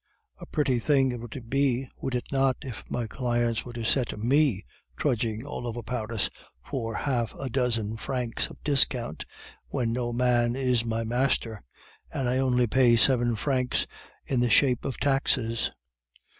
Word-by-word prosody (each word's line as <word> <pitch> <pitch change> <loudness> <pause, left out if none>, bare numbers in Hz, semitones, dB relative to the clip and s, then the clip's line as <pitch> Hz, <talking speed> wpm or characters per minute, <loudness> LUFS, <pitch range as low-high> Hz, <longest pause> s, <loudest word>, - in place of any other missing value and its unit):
A - - -9
pretty 135 -5 +1
thing 135 0 +3
it 120 - -5
would 120 +1 -8
be, 135 0 +1
would 130 - -3
it 125 - -2
not, 135 -2 +2
if 125 -5 -7
my 120 - -1
clients 120 -1 0
were 120 - -9
to 120 -1 -5
set 125 -1 +1
me 120 -2 +2 0.3
trudging 115 -4 -1
all 125 -4 -5
over 120 0 -4
Paris 110 -1 -1 0.4
for 115 -4 -3
half 120 -5 -1
a 135 -3 -5
dozen 115 -4 0
francs 120 +1 -2
of - - -12
discount, 125 - +2 0.4
when 115 -2 -1
no 120 0 -1
man 120 -1 +2
is 125 -3 +1
my 115 0 -1
master, 115 -2 0 0.5
and 130 - -1
I 125 +1 +1
only 125 -2 +3
pay 120 0 +4
seven 120 -1 +4
francs 125 +2 0 0.4
in 130 - 0
the 120 0 +2
shape 125 +2 +4
of 135 -4 -3
taxes? 130 -5 +1
125 Hz, 160 wpm, -27 LUFS, 115-130 Hz, 0.5 s, pay